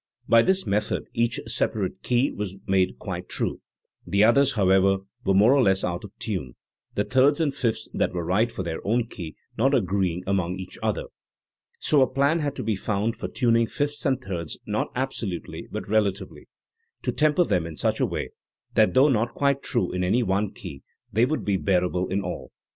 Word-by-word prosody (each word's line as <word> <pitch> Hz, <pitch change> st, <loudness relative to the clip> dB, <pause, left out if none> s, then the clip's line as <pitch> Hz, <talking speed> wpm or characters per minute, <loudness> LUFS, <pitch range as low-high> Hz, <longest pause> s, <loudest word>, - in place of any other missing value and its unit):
By 115 Hz, -, +6 dB
this 190 Hz, +8 st, +1 dB
method 105 Hz, +1 st, 0 dB
each 115 Hz, +1 st, 0 dB
separate 105 Hz, -4 st, -1 dB
key 125 Hz, +3 st, +1 dB
was 100 Hz, -2 st, -5 dB
made 95 Hz, -1 st, +1 dB
quite -, -, -6 dB
true; -, -, -2 dB, 0.4 s
the 100 Hz, +4 st, +2 dB
others, 140 Hz, +5 st, +5 dB
however, 95 Hz, -1 st, +4 dB, 0.3 s
were 95 Hz, -, +4 dB
more 105 Hz, +7 st, +6 dB
or 140 Hz, -, +4 dB
less 95 Hz, -4 st, +3 dB
out 85 Hz, 0 st, -2 dB
of 105 Hz, -, -9 dB
tune, 70 Hz, -, -4 dB, 0.4 s
the 105 Hz, -, +1 dB
thirds 135 Hz, +5 st, +3 dB
and 150 Hz, -4 st, +1 dB
fifths 120 Hz, -5 st, -1 dB
that -, -, 0 dB
were 85 Hz, -2 st, -3 dB
right 110 Hz, +7 st, +2 dB
for 95 Hz, -, -4 dB
their 80 Hz, -2 st, -3 dB
own 115 Hz, +3 st, +1 dB
key 85 Hz, -8 st, -7 dB, 0.2 s
not 135 Hz, +4 st, +4 dB
agree 95 Hz, -5 st, +1 dB
ing 90 Hz, +2 st, -6 dB
among 95 Hz, -2 st, 0 dB
each 95 Hz, -1 st, -8 dB
other. -, -, -1 dB, 0.7 s
So 145 Hz, -3 st, +3 dB
a 130 Hz, -, +5 dB
plan 140 Hz, +5 st, +2 dB
had 145 Hz, -2 st, -2 dB
to -, -, -4 dB
be 110 Hz, -, 0 dB
found 105 Hz, +3 st, -1 dB
for -, -, -5 dB
tuning 115 Hz, -2 st, +2 dB
fifths 145 Hz, +4 st, -2 dB
and 135 Hz, -4 st, +1 dB
thirds 90 Hz, -, -5 dB
not -, -, -1 dB
absolutely 120 Hz, -9 st, -4 dB
but -, -, -5 dB
relatively, 100 Hz, -2 st, -1 dB, 0.6 s
to -, -, 0 dB
"tem 150 Hz, -1 st, +2 dB
per" 180 Hz, -, +5 dB
them 90 Hz, -, 0 dB
in 80 Hz, -2 st, -9 dB
such -, -, 0 dB
a -, -, +3 dB
way -, -, -4 dB, 0.4 s
that 110 Hz, +2 st, +3 dB
though 135 Hz, +3 st, +6 dB
not 120 Hz, -2 st, 0 dB
quite 140 Hz, -1 st, +1 dB
true 90 Hz, -, -1 dB
in 90 Hz, 0 st, -1 dB
any 115 Hz, +7 st, +2 dB
one 100 Hz, 0 st, 0 dB
key 70 Hz, -2 st, -9 dB, 0.3 s
they 115 Hz, +4 st, +4 dB
would 155 Hz, +4 st, -2 dB
be 100 Hz, -2 st, +1 dB
bearable 90 Hz, -1 st, +1 dB
in 100 Hz, +1 st, -1 dB
all. 90 Hz, -, -6 dB
105 Hz, 200 wpm, -25 LUFS, 95-130 Hz, 0.7 s, By